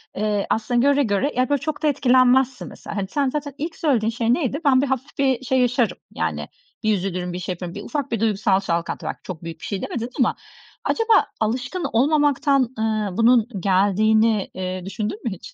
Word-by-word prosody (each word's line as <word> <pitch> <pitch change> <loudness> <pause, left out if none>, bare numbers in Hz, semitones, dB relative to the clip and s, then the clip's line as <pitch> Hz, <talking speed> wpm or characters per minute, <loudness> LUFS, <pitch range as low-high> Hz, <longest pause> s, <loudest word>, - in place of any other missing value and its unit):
eee, 210 -1 -1
aslında 235 +2 +1
göre 285 0 +4
göre, 220 +5 0
yani, 255 +2 +1
böyle 285 -2 +1
çok 310 0 -4
da - - +3
etkilenmezsin 255 -2 +3
mesela. 200 -2 -5
Sen 280 +1 0
zaten 285 0 -4
ilk 320 +3 -4
söylediğin 250 -10 +1
şey 230 0 +1
neydi? 280 0 -1
"Ben, 260 -2 +5
bir 280 - 0
hafif 265 0 -3
bir 265 -3 +1
şey 260 +1 +2
yaşarım, 245 -2 +1 0.2
yani, - - -2 0.4
bir 215 0 +3
üzülürüm, 180 -2 -3
bir 180 - -4
şey 180 +1 -3
yaparım." 175 0 -7
Bir - - -5
ufak 285 -3 -3
bir 230 - 0
duygusal 205 -3 +2
çalkantı. 170 -3 -3
Bak, - - -4
çok 175 -3 -7
büyük 165 -1 -7
bir - - -9
şey 200 -2 -3
demedin 235 0 -4
ama 250 - +3 0.5
acaba 455 -1 +3
alışkın 250 +10 -2
olmamaktan, 280 0 +3
ııı, 215 -4 -1
bunun 230 -1 +4
geldiğini, 205 +3 +2
eee, 185 -1 -4
düşündün 210 +2 -4
mü 235 - -1
hiç 190 - -9
230 Hz, 195 wpm, -22 LUFS, 200-270 Hz, 0.5 s, Ben